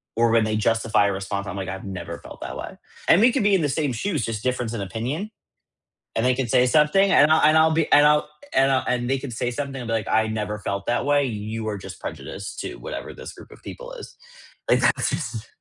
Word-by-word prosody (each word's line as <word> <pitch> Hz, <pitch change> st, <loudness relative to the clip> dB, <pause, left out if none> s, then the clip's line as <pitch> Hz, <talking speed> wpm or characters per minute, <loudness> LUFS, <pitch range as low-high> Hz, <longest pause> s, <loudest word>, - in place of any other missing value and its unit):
or 115 Hz, +1 st, +3 dB
when 115 Hz, -1 st, +4 dB
they 110 Hz, 0 st, -1 dB
justify 110 Hz, -1 st, +2 dB
a -, -, 0 dB
response, 100 Hz, +1 st, -4 dB
I'm 100 Hz, -, -5 dB
like, 95 Hz, -1 st, -4 dB
I've 95 Hz, 0 st, -6 dB
never 90 Hz, -4 st, -6 dB
felt -, -, -12 dB
that -, -, -6 dB
way, -, -, -7 dB, 0.3 s
and 175 Hz, -, +6 dB
we 240 Hz, +2 st, +6 dB
could 260 Hz, 0 st, 0 dB
be 200 Hz, -1 st, +4 dB
in 185 Hz, -, +2 dB
the 145 Hz, -, +1 dB
same 145 Hz, 0 st, 0 dB
shoes, 155 Hz, -, -2 dB
just 110 Hz, -1 st, -4 dB
difference 125 Hz, -2 st, -1 dB
in 110 Hz, -, -3 dB
opinion, 125 Hz, -, -4 dB, 0.9 s
and 115 Hz, -, +1 dB
they 125 Hz, 0 st, +3 dB
can 130 Hz, -2 st, -2 dB
say 125 Hz, -, +4 dB
something, 155 Hz, +9 st, +4 dB
and 150 Hz, +2 st, +6 dB
I'll 160 Hz, -, +5 dB
and 155 Hz, +1 st, +6 dB
I'll 160 Hz, 0 st, +5 dB
be 160 Hz, -1 st, +1 dB
and 145 Hz, 0 st, +7 dB
I'll 150 Hz, 0 st, +3 dB, 0.3 s
and 135 Hz, 0 st, +4 dB
I 130 Hz, -, +4 dB
and 120 Hz, -1 st, 0 dB
they 135 Hz, -, +2 dB
could 130 Hz, -1 st, -7 dB
say 120 Hz, +1 st, -2 dB
something 135 Hz, +1 st, -4 dB
and 120 Hz, -, -6 dB
be 115 Hz, -, -1 dB
like, 110 Hz, -3 st, -2 dB
"I 110 Hz, 0 st, +2 dB
never 105 Hz, -1 st, -3 dB
felt 100 Hz, -1 st, -4 dB
that 120 Hz, -, 0 dB
way, 145 Hz, 0 st, +3 dB
you 110 Hz, -1 st, -4 dB
are 105 Hz, -2 st, -3 dB
just -, -, -10 dB
prejudiced 100 Hz, 0 st, -7 dB
to 370 Hz, -1 st, -5 dB
whatever -, -, -7 dB
this -, -, -9 dB
group -, -, -14 dB
of -, -, -15 dB
people -, -, -9 dB
is," -, -, -10 dB, 0.5 s
like -, -, +4 dB
that -, -, +3 dB
jus -, -, -4 dB
125 Hz, 255 wpm, -23 LUFS, 110-150 Hz, 0.9 s, and